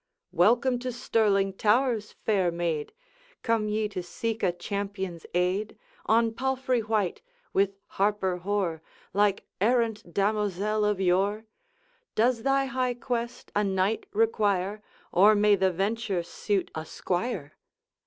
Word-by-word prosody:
'Welcome 240 Hz, +7 st, +3 dB
to 255 Hz, +1 st, -3 dB
Stirling 210 Hz, -5 st, +1 dB
towers, 220 Hz, +1 st, +1 dB
fair 195 Hz, -5 st, +2 dB
maid! 170 Hz, -3 st, -2 dB, 0.5 s
Come 225 Hz, -2 st, +1 dB
ye 215 Hz, 0 st, 0 dB
to 195 Hz, -3 st, -4 dB
seek 225 Hz, +5 st, -4 dB
a 185 Hz, -, +3 dB
champion's 190 Hz, -1 st, -5 dB
aid, 185 Hz, +4 st, 0 dB, 0.3 s
On 225 Hz, +1 st, +4 dB
palfrey 260 Hz, 0 st, 0 dB
white, 215 Hz, -4 st, -1 dB, 0.3 s
with 195 Hz, 0 st, +2 dB
harper 195 Hz, -2 st, 0 dB
hoar, 180 Hz, -3 st, -1 dB, 0.3 s
Like 200 Hz, 0 st, +2 dB, 0.2 s
errant 225 Hz, -4 st, +1 dB
damosel 210 Hz, +1 st, 0 dB
of 210 Hz, -2 st, +1 dB
yore? 195 Hz, +4 st, +1 dB, 0.7 s
Does 230 Hz, +1 st, +2 dB
thy 275 Hz, +2 st, +2 dB
high 255 Hz, -2 st, -1 dB
quest 240 Hz, 0 st, -4 dB
a 210 Hz, -, +3 dB
knight 195 Hz, +2 st, 0 dB
require, 210 Hz, -2 st, +1 dB, 0.3 s
Or 205 Hz, +4 st, +6 dB
may 210 Hz, 0 st, +5 dB
the 190 Hz, -1 st, +2 dB
venture 195 Hz, 0 st, -1 dB
suit 195 Hz, +3 st, -2 dB
a 160 Hz, -, -4 dB
squire?' 175 Hz, -, -3 dB
210 Hz, 125 wpm, -27 LUFS, 190-225 Hz, 0.7 s, Or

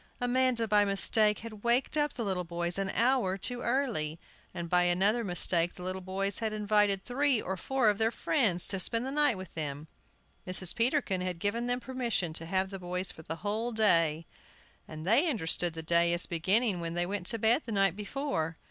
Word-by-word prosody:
Amanda, 245 Hz, -2 st, +1 dB
by 210 Hz, -1 st, +4 dB
mistake, 210 Hz, +1 st, +4 dB
had 215 Hz, -2 st, -10 dB
waked 240 Hz, +5 st, +2 dB
up 295 Hz, -1 st, 0 dB
the 235 Hz, -, -4 dB
little 185 Hz, -2 st, -2 dB
boys 175 Hz, +2 st, -2 dB
an 195 Hz, -1 st, -1 dB
hour 230 Hz, -4 st, +1 dB
too 245 Hz, +5 st, -4 dB
early. 230 Hz, -, -1 dB, 0.3 s
And 170 Hz, -, -6 dB
by 180 Hz, +1 st, +3 dB
another 190 Hz, +7 st, +2 dB
mistake 175 Hz, -2 st, 0 dB
the 180 Hz, -, -10 dB
little 185 Hz, +1 st, -4 dB
boys 195 Hz, +1 st, -2 dB
had 220 Hz, -1 st, -2 dB
invited 210 Hz, -2 st, +1 dB
three 265 Hz, 0 st, +2 dB
or 190 Hz, -2 st, -4 dB
four 260 Hz, +6 st, 0 dB
of 205 Hz, 0 st, +2 dB
their 225 Hz, 0 st, +3 dB
friends 225 Hz, -, +1 dB
to 195 Hz, -, -1 dB
spend 230 Hz, +6 st, +1 dB
the 265 Hz, -, -4 dB
night 290 Hz, -6 st, +2 dB
with 185 Hz, -2 st, -9 dB
them. 150 Hz, -1 st, -5 dB, 0.6 s
Mrs. 185 Hz, -1 st, +5 dB
Peterkin 235 Hz, -6 st, 0 dB
had 180 Hz, -1 st, -3 dB
given 225 Hz, +7 st, -1 dB
them 245 Hz, 0 st, 0 dB
permission 240 Hz, -10 st, -3 dB
to 165 Hz, 0 st, -3 dB
have 190 Hz, +2 st, -1 dB
the 195 Hz, -, -6 dB
boys 180 Hz, +1 st, -3 dB
for -, -, -13 dB
the 160 Hz, +1 st, -6 dB
whole 220 Hz, +4 st, -1 dB
day, 165 Hz, -8 st, +2 dB, 0.6 s
and 155 Hz, 0 st, -9 dB
they 250 Hz, -, +3 dB
understood 175 Hz, -, -1 dB
the 160 Hz, 0 st, -7 dB
day 170 Hz, +1 st, +2 dB
as 175 Hz, -, 0 dB
beginning 190 Hz, +4 st, 0 dB
when 170 Hz, 0 st, -5 dB
they 175 Hz, 0 st, 0 dB
went 195 Hz, -1 st, -4 dB
to 230 Hz, -, +1 dB
bed 225 Hz, +6 st, +2 dB
the -, -, -4 dB
night 195 Hz, -3 st, +2 dB
before. 205 Hz, -, -3 dB
200 Hz, 200 wpm, -30 LUFS, 175-235 Hz, 0.6 s, Mrs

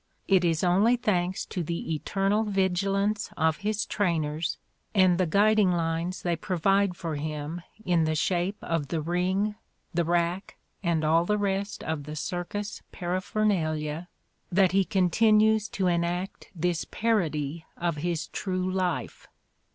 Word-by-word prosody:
It 190 Hz, -2 st, +4 dB
is 165 Hz, -1 st, +1 dB
only 195 Hz, +7 st, +4 dB
thanks 190 Hz, -6 st, 0 dB
to 180 Hz, -, -4 dB
the 170 Hz, 0 st, -3 dB
eternal 195 Hz, +7 st, 0 dB
vigilance 195 Hz, +1 st, 0 dB
of 160 Hz, -1 st, +2 dB
his 215 Hz, +1 st, -1 dB
trainers 160 Hz, -5 st, -1 dB, 0.4 s
and 185 Hz, -2 st, +5 dB
the 185 Hz, -, +2 dB
guiding 205 Hz, +2 st, +4 dB
lines 170 Hz, +1 st, -1 dB
they 175 Hz, -1 st, +1 dB
provide 190 Hz, +3 st, +1 dB
for 165 Hz, -4 st, -3 dB
him 155 Hz, +2 st, -4 dB, 0.2 s
in 170 Hz, -3 st, +3 dB
the 155 Hz, 0 st, 0 dB
shape 180 Hz, +5 st, 0 dB
of 165 Hz, -4 st, -1 dB
the 165 Hz, +2 st, -1 dB
ring, 180 Hz, +6 st, 0 dB, 0.4 s
the 170 Hz, 0 st, +2 dB
rack 175 Hz, +3 st, -1 dB, 0.2 s
and 170 Hz, -4 st, +1 dB
all 165 Hz, +2 st, +4 dB
the 210 Hz, +3 st, +1 dB
rest 200 Hz, 0 st, -2 dB
of 160 Hz, -3 st, -3 dB
the 150 Hz, +1 st, -6 dB
circus 180 Hz, +6 st, -4 dB
paraphernalia 175 Hz, -4 st, -1 dB, 0.4 s
that 185 Hz, 0 st, +4 dB
he 195 Hz, 0 st, +3 dB
continues 215 Hz, +3 st, +3 dB
to 190 Hz, -, -2 dB
enact 175 Hz, +2 st, -1 dB
this 175 Hz, 0 st, 0 dB
parody 165 Hz, -9 st, -1 dB
of 170 Hz, -2 st, -1 dB
his 170 Hz, +1 st, -2 dB
true 185 Hz, -1 st, -2 dB
life. 185 Hz, -2 st, -2 dB
180 Hz, 140 wpm, -27 LUFS, 165-195 Hz, 0.4 s, and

